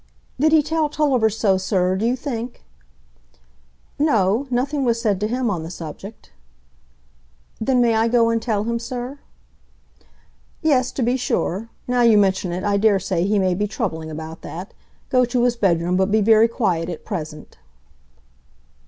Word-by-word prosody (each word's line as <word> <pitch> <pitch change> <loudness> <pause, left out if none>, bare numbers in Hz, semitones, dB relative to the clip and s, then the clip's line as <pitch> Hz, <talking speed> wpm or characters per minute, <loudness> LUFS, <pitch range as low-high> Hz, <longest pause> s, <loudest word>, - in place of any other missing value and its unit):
"Did 310 +3 +3
he 315 -1 +5
tell 310 0 0
Tulliver 275 -7 +2
so, 205 -3 +1
sir, 185 -1 0
do 215 +4 0
you 245 - +1
think?" 245 -3 -6 1.4
"No; 230 -3 +2
nothing 270 +3 -1
was 235 -2 +1
said 210 -5 0
to 210 - 0
him 245 0 -1
on 175 -4 -2
the 160 - -7
subject." 180 +5 -9 1.3
"Then 250 +2 +2
may 235 -1 +3
I 225 +1 +2
go 230 -1 +3
and 230 0 0
tell 215 -3 -1
him, 235 +1 -2
sir?" 250 +3 -6 1.4
"Yes, 260 -5 +2
to 260 - -1
be 245 +3 +1
sure; 230 -3 -2 0.2
now 250 0 +1
you 230 -3 +5
mention 190 -2 +1
it, 180 +2 -4
I 205 -1 +1
dare 205 -1 +4
say 185 -1 -1
he 210 +1 +2
may 185 -2 +2
be 205 +4 -1
troubling 170 -8 -4
about 160 +1 -8
that. 180 +5 -8 0.4
Go 255 -1 +4
to 240 0 0
his 245 -1 +2
bedroom, 180 -4 +1
but 190 +1 +2
be 215 +1 +3
very 220 +2 +5
quiet 180 -8 -1
at 170 - -7
present." 155 -7 -7
220 Hz, 170 wpm, -21 LUFS, 190-245 Hz, 1.4 s, he